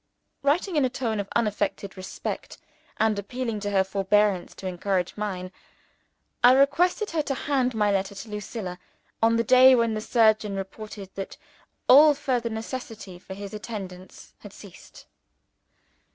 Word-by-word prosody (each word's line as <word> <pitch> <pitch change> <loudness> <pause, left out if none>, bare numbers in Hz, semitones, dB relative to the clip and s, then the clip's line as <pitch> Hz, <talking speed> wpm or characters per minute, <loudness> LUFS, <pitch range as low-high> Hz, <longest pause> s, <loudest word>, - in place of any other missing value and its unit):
Writing 320 +6 +1
in 295 - +3
a 255 - +2
tone 235 -4 -2
of 200 - -4
unaffected 210 -3 -1
respect, 190 0 -6 0.4
and 220 -2 +1
appealing 230 +1 -4
to 205 0 -3
her 195 -1 +3
forbearance 195 0 +1
to - - -10
encourage 185 0 -1
mine, 185 -3 -4 0.9
I 245 +1 +8
requested 350 +10 +2
her 325 -2 +1
to 285 -2 -3
hand 260 -3 0
my 210 -1 +2
letter 195 0 -1
to 220 - -9
Lucilla 210 -3 -6 0.4
on 225 0 +4
the 230 - +2
day 255 +2 +7
when 230 -2 +1
the 215 - -3
surgeon 215 -3 +2
reported 195 0 -8
that 195 -1 -7 0.5
all 295 +3 +8
further 250 -5 -1
necessity 220 -4 -7
for 190 +1 -9
his 200 0 -8
attendance 195 -4 -8
had - - -12
ceased. - - -14
215 Hz, 150 wpm, -25 LUFS, 195-250 Hz, 0.9 s, I